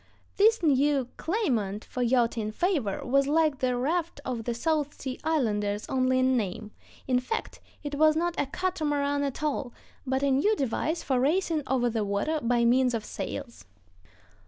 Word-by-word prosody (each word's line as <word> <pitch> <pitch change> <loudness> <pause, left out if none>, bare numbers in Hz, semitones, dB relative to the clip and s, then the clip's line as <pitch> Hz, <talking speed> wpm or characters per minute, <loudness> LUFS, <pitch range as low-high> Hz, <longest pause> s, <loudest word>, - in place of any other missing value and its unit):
This 440 0 +4
new 280 -3 +2
claimant 235 - -1
for 250 - -5
yachting 235 -3 +1
favor 285 - -1
was 275 +2 +2
like 305 -2 +2
the 250 -1 0
raft 325 +5 -1
of 235 -3 -3
the 240 - -1
South 295 +2 -1
Sea 260 -2 -5
Islanders 210 -10 0
only 255 0 +2
in 255 0 +3
name; 210 -1 -3 0.4
in 250 -1 +3
fact, 445 - -4 0.2
it 290 -1 -5
was 310 +1 +4
not 345 +2 0
a 285 - 0
catamaran 290 -4 -1
at 280 +1 -3
all, 280 -4 -2 0.3
but 265 +1 0
a 280 - +3
new 320 +12 +3
device 310 - -1
for 260 -3 +1
racing 320 +3 +1
over 250 -2 +1
the 225 -2 -1
water 205 +11 -1
by 235 0 +2
means 250 0 +3
of 220 -2 -4
sails. 255 - -6
270 Hz, 165 wpm, -27 LUFS, 240-310 Hz, 0.4 s, This